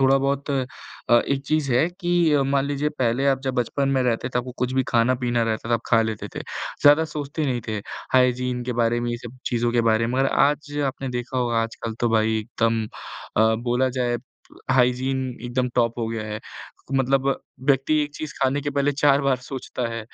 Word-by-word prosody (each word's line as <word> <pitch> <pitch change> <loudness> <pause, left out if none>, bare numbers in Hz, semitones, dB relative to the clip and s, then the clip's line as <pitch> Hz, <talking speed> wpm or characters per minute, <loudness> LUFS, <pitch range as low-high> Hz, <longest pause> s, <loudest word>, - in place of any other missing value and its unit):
थोड़ा-बहुत 135 +1 +2
अ, 135 -2 +1 0.6
एक 140 -1 0
चीज़ 155 -3 +1
है 140 +8 +3
कि 175 -3 +2
अ, 140 -2 +4
मान 135 0 +1
लीजिए 145 +1 -1
पहले 125 +2 +1
आप 135 -1 +2
जब 130 -1 -1
बचपन 135 +3 0
में 135 -1 +2
रहते 125 0 0
थे, - - -14
तो 125 - +1
आप - - -6
कुछ 125 0 -1
भी 130 0 +2
खाना-पीना 120 0 +2
रहता 115 0 -2
था, - - +4
आप 115 - 0
खा 115 - +4
लेते 110 -1 -4
थे, - - -4 0.4
ज़्यादा 145 +2 +7
सोचते 150 +1 -3
नहीं 125 -2 -1
थे, 110 - -1 0.4
हाइजीन 125 -1 +2
के 125 - -2
बारे 120 +1 +1
में 120 0 -2
ये 120 - -2
सब 125 +2 -12
चीज़ों 120 0 0
के 120 - +3
बारे 110 +1 +2
में 125 +2 -1
और 135 - +3
आज 145 +1 +1
आपने 135 0 -4
देखा 125 +1 -3
होगा 120 -2 +1
आजकल 115 0 -5
तो 120 - +2
भाई 110 0 +2
एकदम 115 0 0
अ, 110 +1 -1
बोला 125 +2 +2
जाए 120 -1 +1 0.5
हाइजीन 130 +1 +2 0.3
एकदम 125 +1 -1
टॉप 120 -1 +1
हो 115 - -1
गया 115 -1 -3
है। 105 0 -4 0.6
मतलब 135 +1 +2 0.4
व्यक्ति 135 +2 +3
1 145 0 -5
चीज़ 155 -1 -5
खाने 135 +2 +2
के 145 - -2
पहले 140 0 +1
4 140 -1 +3
सोचता 125 -1 -4
है, 115 0 -4
125 Hz, 205 wpm, -23 LUFS, 120-140 Hz, 0.6 s, ज़्यादा